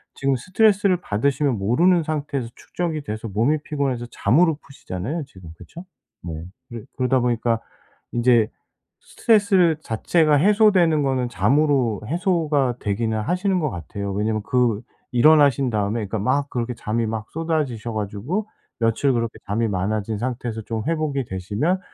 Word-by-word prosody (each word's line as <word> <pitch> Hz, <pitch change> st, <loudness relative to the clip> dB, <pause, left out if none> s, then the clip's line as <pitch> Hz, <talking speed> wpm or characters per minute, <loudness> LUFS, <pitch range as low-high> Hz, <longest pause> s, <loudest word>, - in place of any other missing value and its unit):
지금 135 Hz, 0 st, +1 dB
스트레스를 195 Hz, -, +2 dB
받으시면 135 Hz, +2 st, 0 dB
모르는 165 Hz, -, +3 dB
상태에서 145 Hz, -5 st, -3 dB
축적이 165 Hz, -3 st, -4 dB
돼서 110 Hz, -3 st, -5 dB
몸이 115 Hz, +9 st, +1 dB
피곤해서 135 Hz, -5 st, -2 dB
잠으로 160 Hz, +4 st, +3 dB
푸시잖아요 135 Hz, -, -5 dB
지금 95 Hz, -11 st, -14 dB
그쵸? 170 Hz, -, -11 dB, 0.4 s
네. 80 Hz, -1 st, -6 dB, 0.2 s
그래 120 Hz, -2 st, -7 dB, 0.2 s
그러다 130 Hz, 0 st, +2 dB
보니까 120 Hz, -1 st, +1 dB, 0.5 s
인제 120 Hz, -2 st, +3 dB, 0.5 s
스트레스를 195 Hz, -7 st, +3 dB
자체가 155 Hz, -, +2 dB
해소되는 185 Hz, -2 st, +4 dB
거는 130 Hz, -3 st, 0 dB
잠으로 135 Hz, -4 st, +2 dB
해소가 155 Hz, -, +1 dB
되기는 110 Hz, +2 st, -1 dB
하시는 185 Hz, -, 0 dB
것 150 Hz, -5 st, -1 dB
같아요. 100 Hz, +4 st, -5 dB
왜냐면 105 Hz, +1 st, -1 dB
그 120 Hz, -4 st, +1 dB, 0.3 s
일어나신 140 Hz, -1 st, +4 dB
다음에 105 Hz, +1 st, -1 dB
그러니까 105 Hz, +2 st, -3 dB
막 140 Hz, +7 st, 0 dB
그렇게 120 Hz, 0 st, -3 dB
잠이 115 Hz, 0 st, -2 dB
막 110 Hz, -1 st, -4 dB
쏟아지셔 150 Hz, -9 st, -2 dB
가지고 110 Hz, -, -3 dB, 0.3 s
며칠 115 Hz, +4 st, +2 dB
그렇게 115 Hz, -1 st, -2 dB
잠이 110 Hz, +3 st, 0 dB
많아진 100 Hz, +2 st, -2 dB
상태에서 120 Hz, -2 st, -3 dB
좀 110 Hz, 0 st, -4 dB
회복이 155 Hz, -5 st, -1 dB
되시면 105 Hz, -, -1 dB
125 Hz, 360 characters per minute, -22 LUFS, 110-155 Hz, 0.5 s, 해소되는